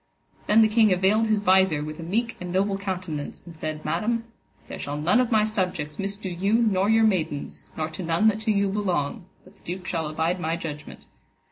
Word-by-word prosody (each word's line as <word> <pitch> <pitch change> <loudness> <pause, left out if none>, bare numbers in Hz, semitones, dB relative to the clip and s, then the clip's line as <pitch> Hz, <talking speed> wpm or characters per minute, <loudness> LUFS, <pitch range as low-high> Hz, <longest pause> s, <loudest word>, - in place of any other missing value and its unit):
Then 220 +2 +6
the - - +5
king 215 0 +4
avaled 195 +5 +3
his 215 -1 +2
visor 190 -6 +3
with 155 +1 -7
a - - -5
meek 225 +8 -1
and 180 0 -5
noble 195 +2 +1
countenance, 185 -6 -5
and 170 -2 -11
said, 155 -1 -5
Madam, 215 +9 0 0.4
there - - -7
shall 145 +1 -4
none 165 +10 +3
of 250 -2 +2
my 220 -2 +3
subjects 185 -8 -2
misdo 200 0 -3
you 190 +4 -1
nor 210 -4 +2
your 225 0 +4
maidens, 165 -8 -1
nor 155 -1 -1
to 160 +3 -7
none 170 +5 +2
that 215 0 -2
to 220 0 0
you 200 -1 +2
belong, 190 -2 -1 0.2
but - - -18
the - - -25
duke 180 +2 -6
shall 165 -4 -2
abide 160 +4 -1
my 165 -1 -1
judgment. 150 -3 -8
185 Hz, 210 wpm, -25 LUFS, 160-215 Hz, 0.4 s, Then